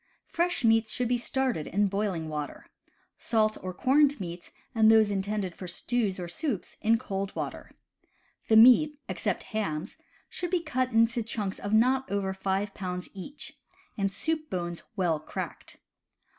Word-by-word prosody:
Fresh 345 Hz, -4 st, -1 dB
meats 225 Hz, -1 st, +4 dB
should 250 Hz, -, 0 dB
be 245 Hz, -, +2 dB
started 255 Hz, -, -1 dB
in 205 Hz, +3 st, +2 dB
boiling. 195 Hz, -5 st, -1 dB
water; 150 Hz, -1 st, -5 dB, 0.5 s
salt 215 Hz, -2 st, +2 dB
or 185 Hz, -, -4 dB
corned 280 Hz, +8 st, +3 dB
meats, 175 Hz, -2 st, -7 dB, 0.2 s
and 220 Hz, -1 st, +5 dB
those 220 Hz, -2 st, +6 dB
intended 200 Hz, -1 st, -2 dB
for 185 Hz, -, -8 dB
stews 200 Hz, +2 st, -1 dB
or 175 Hz, -, -4 dB
soups 220 Hz, -, -3 dB
in 225 Hz, +1 st, +4 dB
cold 195 Hz, -2 st, -4 dB
water. -, -, -5 dB, 0.8 s
The 220 Hz, -, +4 dB
meat 255 Hz, +6 st, +7 dB
(except -, -, -2 dB
hams) 165 Hz, -8 st, -3 dB, 0.3 s
should 355 Hz, -, -4 dB
be 350 Hz, -1 st, 0 dB
cut 255 Hz, -4 st, -1 dB
into 230 Hz, +1 st, +3 dB
chunks 210 Hz, -3 st, -3 dB
of 205 Hz, -, -4 dB
not 255 Hz, +4 st, +3 dB
over 195 Hz, -1 st, -1 dB
five 195 Hz, +1 st, -1 dB
pounds 180 Hz, -1 st, -5 dB
each, 200 Hz, +10 st, -8 dB, 0.4 s
and 195 Hz, -2 st, 0 dB
soup 315 Hz, +7 st, -2 dB
bones 175 Hz, -2 st, -3 dB
well 175 Hz, -6 st, +1 dB
cracked. 155 Hz, -, -7 dB
215 Hz, 155 wpm, -28 LUFS, 190-245 Hz, 0.8 s, meat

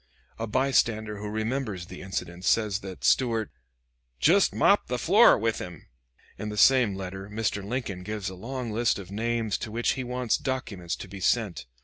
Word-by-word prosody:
A 115 Hz, -, -2 dB
bystander 110 Hz, -4 st, +1 dB
who 105 Hz, 0 st, -5 dB
remembers 110 Hz, -3 st, -2 dB
the -, -, -10 dB
incident 90 Hz, -2 st, -5 dB
says 105 Hz, -1 st, +2 dB
that 95 Hz, -3 st, -9 dB
Stuart 115 Hz, -5 st, +2 dB, 0.7 s
"jest -, -, +4 dB
mopped -, -, +4 dB
the -, -, -1 dB
floor -, -, +6 dB
with 115 Hz, +1 st, -1 dB
him." 90 Hz, -3 st, -9 dB, 0.5 s
In 105 Hz, -, -4 dB
the 105 Hz, -, -6 dB
same 125 Hz, -5 st, +5 dB
letter 95 Hz, +1 st, -6 dB
Mr. 105 Hz, -1 st, -2 dB
Lincoln 105 Hz, -4 st, -4 dB
gives 105 Hz, 0 st, -4 dB
a 95 Hz, -, -4 dB
long 120 Hz, +5 st, -5 dB
list 115 Hz, +2 st, +1 dB
of 95 Hz, -2 st, -9 dB
names 115 Hz, 0 st, -1 dB
to 115 Hz, -, -5 dB
which 115 Hz, +2 st, 0 dB
he 130 Hz, -, -3 dB
wants 125 Hz, -1 st, 0 dB
documents 100 Hz, -10 st, -3 dB
to -, -, -9 dB
be 95 Hz, +1 st, -9 dB
sent. 95 Hz, -, 0 dB
105 Hz, 175 wpm, -27 LUFS, 95-120 Hz, 0.7 s, floor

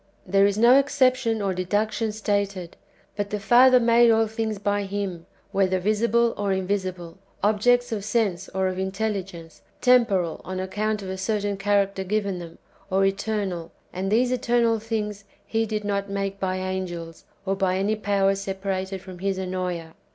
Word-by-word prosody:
"^ -, -, -37 dB, 0.2 s
There 195 Hz, +2 st, +4 dB
is 200 Hz, 0 st, -1 dB
no 240 Hz, +4 st, +7 dB
exception 255 Hz, -5 st, +1 dB
or 195 Hz, -1 st, 0 dB
deduc 205 Hz, +4 st, 0 dB
tion 220 Hz, +1 st, -2 dB
stated; 200 Hz, -4 st, -2 dB, 0.4 s
but 205 Hz, -1 st, -3 dB
the 210 Hz, -, -3 dB
Father 250 Hz, +4 st, +6 dB
made 235 Hz, 0 st, +5 dB
all 225 Hz, 0 st, +4 dB
things 220 Hz, -1 st, -3 dB
by 205 Hz, +1 st, 0 dB
Him, 195 Hz, -4 st, -4 dB, 0.2 s
whether 190 Hz, -1 st, +2 dB
visible 230 Hz, +4 st, +2 dB
or 205 Hz, -1 st, -1 dB
invisible, 185 Hz, -2 st, -3 dB, 0.2 s
objects 245 Hz, +4 st, +3 dB
of 210 Hz, -3 st, -2 dB
sense 205 Hz, -4 st, -1 dB
or 190 Hz, 0 st, 0 dB
of 185 Hz, 0 st, -3 dB
intelligence, 190 Hz, -4 st, -4 dB, 0.2 s
tem 250 Hz, -2 st, +5 dB
poral, 180 Hz, -6 st, -1 dB
on 185 Hz, +1 st, -5 dB
account 210 Hz, +3 st, -2 dB
of 190 Hz, -, -6 dB
a 190 Hz, -, -5 dB
certain 205 Hz, +1 st, -1 dB
character 200 Hz, -1 st, +1 dB
given 200 Hz, -1 st, -1 dB
them, 170 Hz, -1 st, -10 dB, 0.3 s
or 195 Hz, 0 st, +2 dB
eternal; 195 Hz, -4 st, -2 dB, 0.2 s
and 190 Hz, +2 st, -3 dB
these 245 Hz, +3 st, +3 dB
eternal^ 235 Hz, -2 st, +1 dB
things 210 Hz, -2 st, -3 dB, 0.2 s
He 225 Hz, 0 st, -1 dB
did 215 Hz, -1 st, -3 dB
not 200 Hz, -1 st, -2 dB
make 195 Hz, 0 st, -3 dB
by 185 Hz, -1 st, -1 dB
angels, 185 Hz, -3 st, -5 dB, 0.2 s
or 195 Hz, 0 st, 0 dB
by 190 Hz, -1 st, 0 dB
any 200 Hz, +3 st, +1 dB
powers 195 Hz, -2 st, +1 dB
separated 195 Hz, -1 st, -3 dB
from 185 Hz, -2 st, -11 dB
His 195 Hz, 0 st, -1 dB
Ennoea. 180 Hz, -3 st, -4 dB
200 Hz, 170 wpm, -24 LUFS, 190-220 Hz, 0.4 s, no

